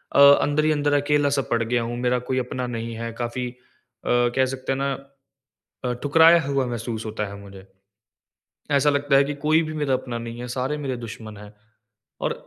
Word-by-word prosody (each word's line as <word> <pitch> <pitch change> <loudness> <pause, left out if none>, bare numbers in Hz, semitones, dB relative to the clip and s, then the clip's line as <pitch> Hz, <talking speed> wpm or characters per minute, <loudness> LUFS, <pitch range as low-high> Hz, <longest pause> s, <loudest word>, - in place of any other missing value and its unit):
अ, - - +5 0.2
अंदर 145 +1 +1
ही 155 - +3
अंदर 145 -1 +1
अकेला-सा 145 -1 +2
पड़ 115 -1 +2
गया 120 +1 0
हूँ, 120 +1 -4
मेरा 125 0 +1
कोई 130 - 0
अपना 125 0 -3
नहीं 115 -1 -4
है। 115 +1 -5
काफ़ी 120 +1 -3
अ, - - -14 0.8
कह 130 0 +4
सकते 130 0 -4
है 135 - 0
ना 140 0 -1 0.9
अ, 125 - 0
ठुकराया 165 +3 +6
हुआ 140 -2 +1
महसूस 115 -1 -4
होता 110 -1 -3
है 100 - -8
मुझे। 100 -1 -12 1.1
ऐसा 145 +1 +4
लगता 145 -1 +2
है 140 - +5
कि 145 +1 -3
कोई 155 +2 +4
भी 155 -1 -5
मेरा 145 -3 0
अपना 125 -2 -3
नहीं 115 0 -7
है, 125 - -6
सारे 130 +4 -2
मेरे 135 -3 -3
दुश्मन 110 -1 -9
है। 105 +1 -12 0.7
और - - 0
130 Hz, 195 wpm, -23 LUFS, 115-145 Hz, 1.1 s, ठुकराया